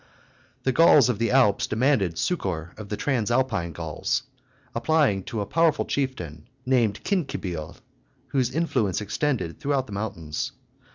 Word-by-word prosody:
The 130 - +2
Gauls 150 -4 +6
of 115 -4 0
the 115 - +1
Alps 125 -6 +4
demanded 110 - +1
succor 90 - -2
of 110 -2 -9
the 105 - -3
Transalpine 120 - 0
Gauls, 80 - -2 0.5
applying 120 -5 +2
to 115 -4 -3
a - - -2
powerful 165 +4 +2
chieftain, 90 - -3 0.2
named 120 -5 +2
Cincibil, 90 - -2 0.5
whose 125 -1 +1
influence 125 - 0
extended 110 - -2
throughout 140 -2 0
the 105 - -10
mountains. 85 -8 -4
115 Hz, 130 wpm, -25 LUFS, 95-135 Hz, 0.5 s, Gauls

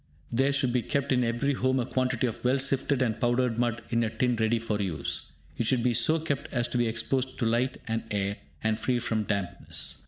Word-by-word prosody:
There 135 +4 +3
should 135 -3 +1
be 125 - +2
kept 140 +3 -1
in 125 -1 +3
every 120 +4 +1
home 130 0 +1
a 120 - 0
quantity 130 -1 0
of 115 - -4
well 125 +2 +3
sifted 135 0 +1
and 115 -3 -1
powdered 120 -1 +2
mud 120 -1 0
in 115 0 +2
a 110 - 0
tin 125 +2 +1
ready 110 +1 +2
for 110 -2 -2
use. 90 -6 -3 0.3
It 115 - +1
should 125 -1 +2
be 125 -1 +3
so 120 +8 +4
kept 145 -3 -3
as 120 -1 +1
to 125 - 0
be 120 - +2
exposed 130 +3 -1
to 120 - 0
light 120 +3 +1
and 115 0 -1
air, 100 -1 -1 0.3
and 110 0 +1
free 125 +2 +1
from 110 -2 -1
dampness. 100 -5 -3
120 Hz, 225 wpm, -28 LUFS, 115-130 Hz, 0.3 s, so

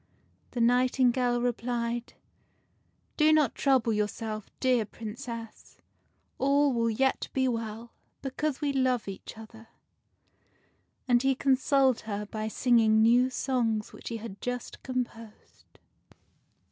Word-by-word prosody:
The 245 - -3
nightingale 245 0 +3
replied, 240 -1 -2 0.5
" - - -43
Do 305 0 +5
not 305 -4 +3
trouble 260 -5 +2
yourself, 215 0 -3
dear 250 -3 +2
Princess: 225 +2 -8 0.6
all 280 +1 +3
will 230 -1 +1
yet 265 +4 0
be 260 -1 +1
well, 230 -1 -4 0.3
because 275 +2 -2
we 285 -1 0
love 255 -4 +1
each 195 +3 -8
other." 225 0 -12 1.4
And 240 -1 +4
he 270 0 +2
consoled 265 -1 +3
her 205 0 -3
by 215 +1 -4
singing 220 -2 +3
new 245 +3 +5
songs 235 -5 -1
which - - -8
he 230 - -3
had 215 -3 -9
just 245 -1 -5
composed. 235 -4 -7
240 Hz, 120 wpm, -28 LUFS, 225-260 Hz, 1.4 s, Do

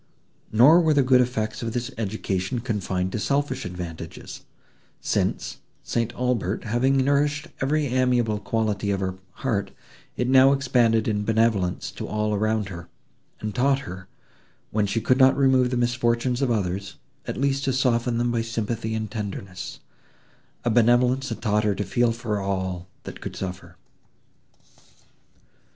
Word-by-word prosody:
Nor 140 +11 +7
were 160 -2 +3
the 140 - +4
good 130 0 +5
effects 110 -3 -2
of 115 -1 -3
this 120 -1 -3
education 100 -1 -2
confined 95 -6 -2
to 110 - -2
selfish 145 +5 -1
advantages, 85 -2 -7 0.6
since, - - -1 0.3
St. 115 -1 -1
Aubert 120 -6 -1
having 120 +5 +2
nourished 145 +3 +1
every 150 +3 +1
amiable 125 -4 +1
quality 105 -2 -1
of 100 -1 0
her 95 -1 -3 0.3
heart, 105 -6 0 0.5
it 125 - 0
now 130 +1 +6
expanded 120 -5 +2
in 105 -2 0
benevolence 110 -5 +1
to - - -6
all 105 0 -1
around 110 -1 0
her, 85 -2 -9 0.5
and 105 -1 -3
taught 135 +2 +3
her, 95 -3 -8 0.6
when 105 -1 +1
she 105 +3 -1
could 130 +3 +2
not 130 0 +6
remove 130 -2 +4
the 125 - -1
misfortunes 120 +1 +1
of 135 - +2
others, 100 -3 -2 0.3
at - - -3
least 140 +1 0
to 135 - +2
soften 125 -2 +1
them 120 0 +1
by 115 -1 0
sympathy 115 0 -3
and 110 -2 -4
tenderness;—a 100 +2 -8
benevolence 125 +3 +3
that 115 - -6
taught 105 -1 +2
her 105 -2 +1
to 105 - -2
feel 120 +2 +1
for 115 -2 -2
all, 95 -2 -3 0.2
that - - -9
could - - -6
suffer. 90 -1 -6
115 Hz, 150 wpm, -24 LUFS, 105-125 Hz, 0.6 s, Nor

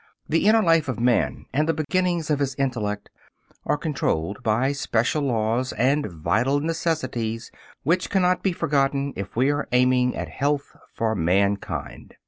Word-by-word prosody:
The 165 +5 +2
inner 220 0 +5
life 165 -3 +3
of 130 -4 -3
man 120 0 +1
and 150 +4 +1
the 165 - +2
beginnings 170 +1 0
of 145 - +1
his 135 -2 -1
intellect 115 -7 -2 0.6
are - - +2
controlled 105 - -2
by 120 +4 +1
special 140 0 0
laws 120 -1 0
and 135 +5 +1
vital 110 - 0
necessities 135 -8 -2 0.3
which 170 +6 +1
cannot 180 -2 +2
be 195 - +1
forgotten 140 -3 0
if 100 +1 -6
we 130 +4 +3
are 145 0 -2
aiming 125 0 +3
at - - -4
health 145 0 -2 0.2
for 110 -1 -1
mankind. 100 +2 -1
135 Hz, 150 wpm, -24 LUFS, 115-150 Hz, 0.6 s, inner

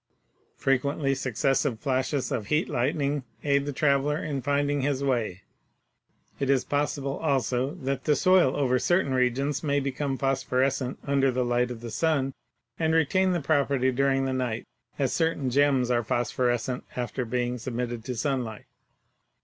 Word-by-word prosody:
Frequently 135 +1 +1
successive 135 -1 0
flashes 130 +1 -1
of 105 - -2
'heat 150 +3 +1
lightning' 140 +2 0 0.2
aid 140 -1 +2
the - - -1
traveler 140 +1 +2
in 145 -4 -3
finding 145 +1 +1
his 140 0 0
way. 115 -8 -1 1.0
It 135 - -1
is 135 -2 +3
possible, 145 -1 -1
also, 135 - 0
that 135 -5 -3
the 150 - +4
soil 185 -7 +4
over 130 -3 +2
certain 175 0 +2
regions 130 +3 +1
may 145 -2 +1
become 135 0 -2
phosphorescent 135 -1 0
under 140 -1 +2
the 125 -1 0
light 120 0 +1
of 120 -2 -7
the 120 -1 -6
sun 140 -1 +1 0.5
and 160 0 +2
retain 185 +4 +3
the 175 - 0
property 140 -3 +2
during 135 +1 +1
the 130 - -1
night, 125 -3 -2 0.3
as 135 -3 0
certain 160 -6 0
gems 135 -2 +3
are 120 -1 +2
phosphorescent 120 +2 -1
after 125 +1 -2
being 125 +1 -2
submitted 120 -1 -4
to 125 - -3
sunlight. 120 -3 -2
135 Hz, 150 wpm, -27 LUFS, 125-145 Hz, 1.0 s, the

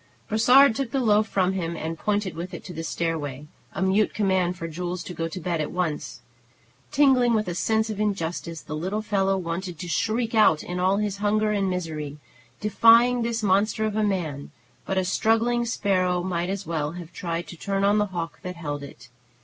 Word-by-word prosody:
Brossard 250 +4 +6
took 265 +1 -2
the 270 - -1
loaf 215 -3 +3
from 190 -2 +1
him, 170 -3 -3
and 160 +1 -4
pointed 205 +2 -1
with 170 +2 -6
it - - -9
to 180 - -8
the 165 0 -5
stairway, 150 -5 -3 0.3
a - - -2
mute 195 +3 +2
command 190 -3 +1
for 165 - -5
Jules 175 +2 -4
to 180 - -7
go 165 -1 -2
to 165 +3 -6
bed 170 -2 -1
at 150 - -2
once. 175 -4 -3 0.7
Tingling 255 -5 +4
with 215 -2 0
a 175 - -2
sense 220 +4 0
of 210 - -6
injustice, 170 -5 -2
the 155 - -6
little 190 +7 -2
fellow 195 -2 +1
wanted 175 0 -4
to 180 - -6
shriek 220 +8 0
out 210 -8 +4
in 180 0 -4
all 190 +2 +2
his 205 -1 -1
hunger 210 +1 +1
and 200 -2 +1
misery, 155 -5 -4 0.4
defying 230 +4 +5
this 230 -1 -2
monster 205 +3 +2
of 215 -1 -2
a 215 - +1
man; 170 -9 -2 0.4
but 195 - -1
a 190 - +1
struggling 225 +5 +2
sparrow 185 -5 +1
might 175 -1 -2
as 200 0 -3
well 155 -2 -2
have 175 -1 -9
tried 170 -1 -3
to - - -8
turn 195 +3 -2
on 205 +1 +4
the 210 - +1
hawk 170 -3 -5
that 180 0 -6
held 145 -4 -4
it. 140 -3 -12
190 Hz, 205 wpm, -25 LUFS, 170-215 Hz, 0.7 s, Brossard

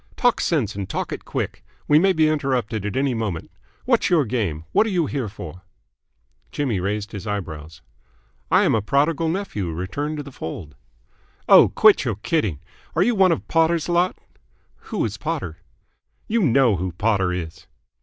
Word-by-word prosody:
"Talk 245 -2 +2
sense 130 - 0
and 100 -2 -5
talk - - -3
it - - -6
quick. - - -4 0.2
We 150 - +6
may 190 +3 +4
be 160 -3 +3
interrupted 125 -8 -1
at 105 - -3
any 135 -1 +1
moment. 105 -8 -4 0.3
What's - - +2
your 160 -6 +3
game? 100 -10 -2
What 220 - +3
are - - -1
you 180 -5 +1
here 135 -7 -3
for?" 95 -2 -9 0.9
Jimmy 130 -9 -1
raised 100 +2 -3
his 105 +1 -7
eyebrows. 80 -7 -6 0.7
"I - - +5
am - - +3
a 110 - +2
prodigal 150 +8 +1
nephew 160 - -3
returned 100 - -4
to 145 - -4
the 140 - -10
fold." 80 - -7 0.7
"Oh, - - +8
quit - - +5
your - - -1
kidding. 105 - -1 0.4
Are 165 - +4
you 240 - +2
one 190 -4 +4
of 165 - -2
Potter's 165 0 +2
lot?" 175 +1 +1 0.7
"Who - - -1
is - - -4
Potter?" 80 - -4 0.7
"You 230 +1 +1
know 130 - +4
who 90 0 -3
Potter 100 -1 +1
is." 85 -2 -6
115 Hz, 175 wpm, -22 LUFS, 95-160 Hz, 0.9 s, Oh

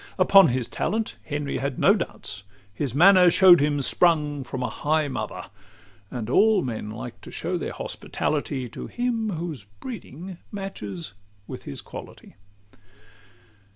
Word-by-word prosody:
Upon 195 0 +7
his 125 -1 -1
talent 220 +1 -2
Henry 145 -1 -3
had 140 -2 -3
no 195 - +5
doubts; 170 - -4 0.3
His 130 +3 -3
manner 180 +3 +7
show'd 175 -1 +7
him 145 -1 +1
sprung 150 -2 +2
from 130 0 -5
a - - 0
high 155 +3 0
mother; 135 - -5 0.6
And 120 -4 -5
all 205 - +4
men 110 -4 -4
like 110 - -8
to - - -11
show - - -3
their - - -3
hospitality 140 -4 -3
To - - -7
him 240 -3 -1
whose 165 - -5
breeding 180 - -9
matches 105 - -6 0.3
with - - -9
his 70 - -5
quality. - - -11
150 Hz, 140 wpm, -25 LUFS, 130-190 Hz, 0.6 s, Upon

